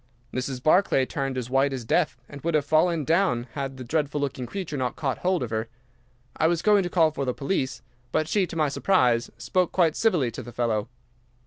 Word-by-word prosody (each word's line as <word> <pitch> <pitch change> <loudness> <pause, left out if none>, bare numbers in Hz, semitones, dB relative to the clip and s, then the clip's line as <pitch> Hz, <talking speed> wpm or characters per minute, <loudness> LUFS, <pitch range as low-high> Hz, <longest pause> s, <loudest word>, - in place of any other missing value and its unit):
Mrs. 130 0 -3
Barclay 155 -5 +4
turned 135 -1 -3
as 125 0 -4
white 135 +1 +3
as 130 -3 -5
death, 150 +1 +1
and 140 -1 -10
would 170 +1 0
have 145 -2 +2
fallen 160 0 +2
down 165 -7 +2
had 135 -2 -4
the 130 - -7
dreadful 150 +2 -1
looking 130 -3 -3
creature 185 -4 -5
not 130 -3 -2
caught 135 -6 -2
hold 180 -3 +1
of 115 - -5
her. 110 0 -2 0.7
I 160 - +2
was 170 0 0
going 210 -1 +5
to 180 - -3
call 165 -3 +3
for 140 - -3
the 125 -2 -1
police, 135 -2 -2 0.3
but 155 - +1
she, 190 +2 +1
to - - -8
my 155 -3 +2
surprise, 125 -7 +2
spoke 180 -2 0
quite 165 -4 +2
civilly 170 - +2
to - - -7
the 120 - -9
fellow. 115 -2 -1
140 Hz, 215 wpm, -25 LUFS, 125-170 Hz, 0.7 s, going